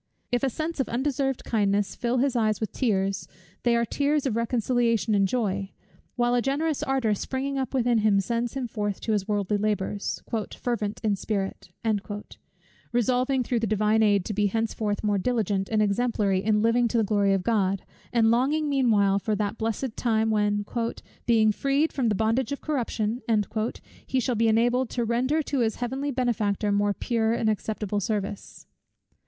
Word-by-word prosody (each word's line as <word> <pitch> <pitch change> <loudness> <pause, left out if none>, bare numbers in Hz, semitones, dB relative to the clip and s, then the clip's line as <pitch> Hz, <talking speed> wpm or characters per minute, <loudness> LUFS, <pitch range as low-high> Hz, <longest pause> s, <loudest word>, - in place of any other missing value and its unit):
If 245 -1 +1
a 270 - +2
sense 315 +5 -4
of 270 - 0
undeserved 270 +1 -1
kindness 205 -2 0
fill 240 0 -1
his 265 0 +1
eyes 215 -2 +1
with 220 - -3
tears, 195 -6 0 0.3
they 240 -1 +2
are 235 0 +2
tears 285 +4 0
of 250 -5 0
reconciliation 230 -1 +1
and 195 -1 +3
joy: 200 -4 -2 0.4
while 240 -1 +2
a 245 - +3
generous 290 +4 0
ardour 265 -5 +1
springing 270 +6 -2
up 265 0 -3
within 240 -2 +3
him 210 -2 +3
sends 235 +5 -2
him 260 -2 -2
forth 205 -3 -3
to 225 - -2
his 205 -3 0
worldly 205 -1 0
labours 205 -1 -2 0.4
"fervent 215 -4 -2
in 210 -2 +2
spirit;" 195 -2 -3 1.2
resolving 250 +2 +1
through 240 0 0
the 225 - -1
Divine 215 +1 +2
aid 205 -3 +3
to 215 - -3
be 205 0 +2
henceforth 215 0 -1
more 205 -2 +1
diligent 205 -3 0
and 215 -1 +2
exemplary 205 -3 +1
in 210 0 +2
living 235 +1 +3
to 235 - -1
the 225 - +3
Glory 200 -1 +2
of 190 - -2
God, 195 -4 +1 0.3
and 225 -2 +4
longing 285 +6 +2
meanwhile 215 -8 +3
for 215 +1 -1
that 210 +1 -2
blessed 225 +2 -2
time, 220 -2 +1
when, 205 -1 +1 0.6
"being 220 -2 +4
freed 275 +7 +1
from 250 -5 +1
the 210 - +1
bondage 225 +5 +1
of 280 - -3
corruption," 240 -5 -2 0.9
he 260 - +1
shall 250 0 0
be 225 0 +2
enabled 240 +3 +2
to 240 -2 -1
render 260 +7 +1
to 280 -1 -2
his 225 -2 +1
Heavenly 265 +4 -3
Benefactor 225 -6 0
more 205 0 +1
pure 230 -2 0
and 230 - 0
acceptable 210 -1 -2
service. 205 0 -4
225 Hz, 175 wpm, -26 LUFS, 205-250 Hz, 1.2 s, and